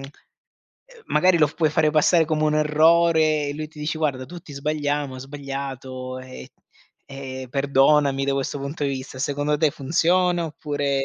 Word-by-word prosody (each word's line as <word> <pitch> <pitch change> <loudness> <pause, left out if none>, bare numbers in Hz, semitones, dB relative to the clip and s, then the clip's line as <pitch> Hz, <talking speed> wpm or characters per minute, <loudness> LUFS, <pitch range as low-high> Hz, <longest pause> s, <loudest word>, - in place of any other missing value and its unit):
uhm, - - -9 1.0
magari 185 -1 +3
lo 155 - +5
f 145 - -11
puoi 160 -1 +2
fare 155 0 +2
passare 155 +2 +4
come 155 -1 0
un 150 0 +2
errore 155 0 +3
e 145 - -4
lui 155 +1 -5
ti 155 0 -17
dice: 150 +1 -3
"Guarda 140 -5 -1
tutti 170 0 -11
sbagliamo, 145 -1 -2
ho - - -9
sbagliato, 135 -2 -6
ehm 130 0 -10 0.6
ehm, 130 -1 -7
perdonami 140 +1 +3
da 140 - 0
questo 135 +1 -2
punto 140 +2 -4
di - - +1
vista". 130 -1 -6
Secondo 145 +2 -1
te 155 -1 +3
funziona, 170 +5 +1
oppure 145 -2 -2
è - - 0
145 Hz, 175 wpm, -23 LUFS, 135-155 Hz, 1.0 s, lo